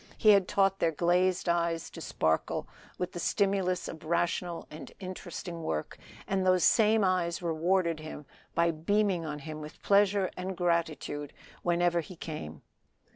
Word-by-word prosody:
He 215 - +4
had 200 -3 +6
taught 195 -1 +2
their 165 - +2
glazed 180 +3 +2
eyes 170 -1 0
to - - -9
sparkle 80 0 0 0.3
with 180 0 -3
the 175 - -6
stimulus 190 0 +1
of 160 - -8
rational 170 +1 -1
and 155 - -9
interesting 180 -2 -6
work, 80 - -3 0.3
and 190 -1 0
those 185 -1 +3
same 220 -2 +5
eyes 180 -2 +1
rewarded 170 0 +1
him 155 -1 -8 0.3
by 170 0 +3
beaming 180 +2 +1
on 150 -1 -4
him 155 +1 -7
with 150 0 -10
pleasure 200 -1 +3
and 185 0 -4
gratitude 160 -4 -1 0.3
whenever 175 0 +2
he 180 +3 -11
came. 150 - -7
175 Hz, 150 wpm, -30 LUFS, 165-185 Hz, 0.3 s, had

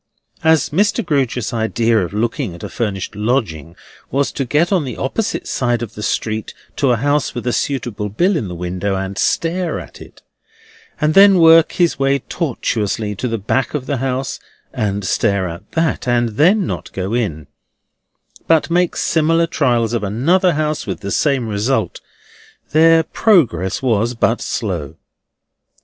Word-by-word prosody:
As 160 -3 +3
Mr. 205 +7 +1
Grewgious's 130 -5 -1
idea 115 0 +1
of 90 -4 -2
looking 115 - -2
at 85 - -12
a - - -5
furnished 100 -4 -3
lodging 105 - -2 0.3
was 140 +1 0
to 135 - -3
get 150 - +1
on 185 -5 +2
the 125 -5 -6
opposite 200 +11 -2
side 120 -2 0
of 115 - -7
the 105 - -8
street 110 0 -2 0.2
to 140 - +2
a 120 - +4
house 145 +5 0
with 120 - -5
a 125 - 0
suitable 120 -7 -2
bill 180 - +1
in 125 -11 -2
the 90 - -6
window, 90 +3 -3
and 95 0 -4
stare 170 0 0
at - - -12
it; - - -15 0.8
and 150 +1 +2
then 195 +1 +7
work 165 -1 +6
his 175 -5 +1
way 135 0 +2
tortuously 115 - -2
to 105 +6 -3
the 115 -1 -2
back 130 +8 -1
of 135 -3 -3
the 140 0 -2
house, 130 +1 -3 0.3
and 100 -2 -2
stare 100 -2 +1
at 85 +1 -9
that; 165 -5 0
and 120 -1 +2
then 175 - +3
not - - -5
go 95 +3 -3
in, 90 -11 -2 1.0
but 165 0 +2
make 175 0 +2
similar 165 +1 +2
trials 120 -8 0
of 120 - 0
another 165 - +2
house, 150 -2 -2
with 95 +1 -4
the 100 -1 -5
same 135 -3 +1
result; 110 +5 -1 0.7
their 165 +1 +5
progress 135 - +1
was 120 -1 +1
but 115 +1 +1
slow. 85 -8 -3
125 Hz, 165 wpm, -18 LUFS, 105-155 Hz, 1.0 s, then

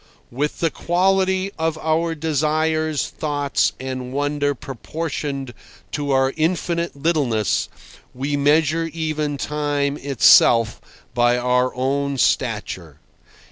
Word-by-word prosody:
With 145 +5 -2
the 165 -2 +2
quality 190 +2 +1
of 160 0 0
our 160 +1 0
desires, 155 0 0
thoughts, 145 -2 0
and 130 -1 -5
wonder 145 +1 0
proportioned 140 0 -5 0.4
to 145 -1 -3
our 135 0 +2
infinite 170 +1 -1
littleness, 140 - 0 0.4
we 140 +3 -2
measure 155 +3 +2
even 155 -3 -2
time 145 -1 -1
itself 120 -4 +5 0.3
by 120 0 +3
our 125 +1 +1
own 140 +2 -1
stature. - - -1
145 Hz, 100 wpm, -21 LUFS, 135-160 Hz, 0.4 s, itself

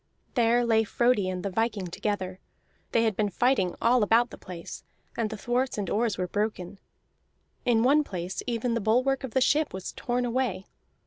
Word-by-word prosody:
There 240 0 +3
lay 225 -1 +3
Frodi 220 -3 +2
and 180 -1 -4
the 200 - -1
viking 215 -1 -1
together: 185 +1 -3 0.5
they 230 - +3
had 220 -3 +1
been 210 0 +1
fighting 200 -3 +1
all 240 +1 +3
about 230 +3 +3
the - - -9
place, 175 -3 -8 0.3
and 225 -2 -1
the 220 - -6
thwarts 245 +4 -1
and 200 -3 -3
oars 220 -2 +1
were 180 - -1
broken; 205 -1 -3 0.9
in 230 -2 +3
one 290 +4 +4
place 185 -6 -5
even 235 0 -1
the 230 - 0
bulwark 255 +6 +2
of 265 -2 -6
the 260 - +4
ship 295 -2 +2
was 190 - -5
torn 245 0 -2
away. 240 -6 -1
225 Hz, 185 wpm, -27 LUFS, 195-245 Hz, 0.9 s, one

